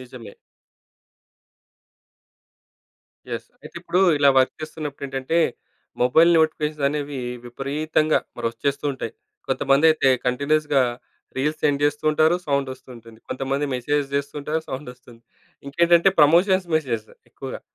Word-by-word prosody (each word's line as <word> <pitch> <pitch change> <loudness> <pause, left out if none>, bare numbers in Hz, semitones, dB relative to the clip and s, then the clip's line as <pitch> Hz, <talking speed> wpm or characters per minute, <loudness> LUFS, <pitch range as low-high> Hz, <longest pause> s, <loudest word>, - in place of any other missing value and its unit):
నిజమే. 125 -5 -11 3.0
యెస్. - - -5 0.2
అయితే, - - -12
ఇప్పుడూ 180 - 0 0.2
ఇలా 140 - +5
వర్క్ 130 - +2
చేస్తున్నప్పుడేంటంటే, 145 -1 -4 0.6
మొబైల్ 160 +8 +5
నోటిఫికేషన్సనేవి 150 -2 -1 0.3
విపరీతంగా 150 +5 0 0.2
మరొచ్చేస్తూ 120 +5 -3
ఉంటాయి. 130 - -6 0.4
కొంతమందయితే 145 +1 +3 0.2
కంటిన్యూస్‌గా. 140 +2 +1 0.5
రీల్స్ 150 +4 -1
సెండ్ 145 -1 +1
చేస్తూ 145 +1 -1
ఉంటారు, 155 +2 +3
సౌండొస్తుంటుంది. 130 -5 -4
కొంతమంది 135 +2 -2
మెసేజ్ 145 +4 0
జేస్తుంటేనే 145 +2 -2
సౌండొస్తుంది. 125 -3 -9 0.4
ఇంకేంటంటే, 170 +5 +4
ప్రమోషన్స్ 180 +5 +4
మెసేజ్ 120 -8 -3 0.2
ఎక్కువగా. - - -8
140 Hz, 90 wpm, -22 LUFS, 130-155 Hz, 3.0 s, ఇలా